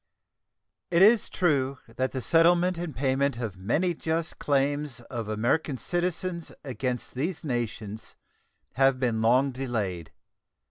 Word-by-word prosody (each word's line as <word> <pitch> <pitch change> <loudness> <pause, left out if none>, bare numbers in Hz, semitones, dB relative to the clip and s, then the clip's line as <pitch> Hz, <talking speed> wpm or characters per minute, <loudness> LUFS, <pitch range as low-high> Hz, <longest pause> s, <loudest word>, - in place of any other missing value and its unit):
It 175 +1 +5
is 220 +1 +5
true 140 -6 +1 0.2
that 130 0 0
the 130 -2 -4
settlement 175 +2 +4
and 170 -6 -5
payment 135 0 +1
of 115 -6 -4
many 135 - 0
just 160 +1 -3
claims 145 -1 0
of 115 -2 -6
American 120 +7 0
citizens 175 +4 -2
against 125 -3 -3
these 155 +7 -3
nations 115 -5 -4 0.6
have 135 -1 +3
been 120 -4 0
long 130 +5 +4
delayed. 110 -10 -3
135 Hz, 125 wpm, -27 LUFS, 120-165 Hz, 0.6 s, It